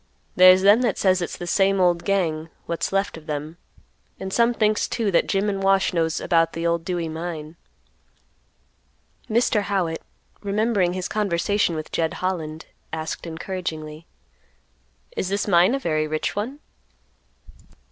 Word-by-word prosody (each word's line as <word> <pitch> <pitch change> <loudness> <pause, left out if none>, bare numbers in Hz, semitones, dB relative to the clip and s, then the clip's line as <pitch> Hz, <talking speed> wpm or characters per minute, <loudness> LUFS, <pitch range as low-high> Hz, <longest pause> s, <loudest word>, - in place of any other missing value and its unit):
There's 185 +1 +7
them 205 +4 +6
that 235 -5 0
says 185 -1 +2
it's 175 - -4
the 175 - -6
same 195 +2 +2
old 175 -2 +2
gang, 165 -5 0 0.2
what's 170 - -2
left 195 -2 0
of 160 0 -14
them, 150 +2 -4 0.6
and 190 0 -5
some 235 0 +4
thinks 215 -2 +1
too 225 -4 -1
that 170 - +2
Jim 195 +1 +1
and 195 -1 -1
Wash 195 -1 +3
knows 165 -2 0
about 165 -1 +2
the 165 0 -3
old 170 0 +1
Dewey 175 -2 -2
mine." 160 -1 -6 1.7
Mr. 225 -1 +2
Howitt, 190 -5 -1 0.4
remembering 205 -3 +1
his 185 -1 -3
conversation 200 -2 0
with 155 0 -6
Jed 160 -1 -1
Holland, 165 -4 -3 0.3
asked 160 +1 -5
encouragingly, 160 -2 -5 1.1
"Is 185 - -2
this 200 +1 -1
mine 185 +5 +4
a - - -2
very 155 -8 0
rich 155 0 -2
one?" 250 +9 -4
180 Hz, 145 wpm, -23 LUFS, 165-200 Hz, 1.7 s, There's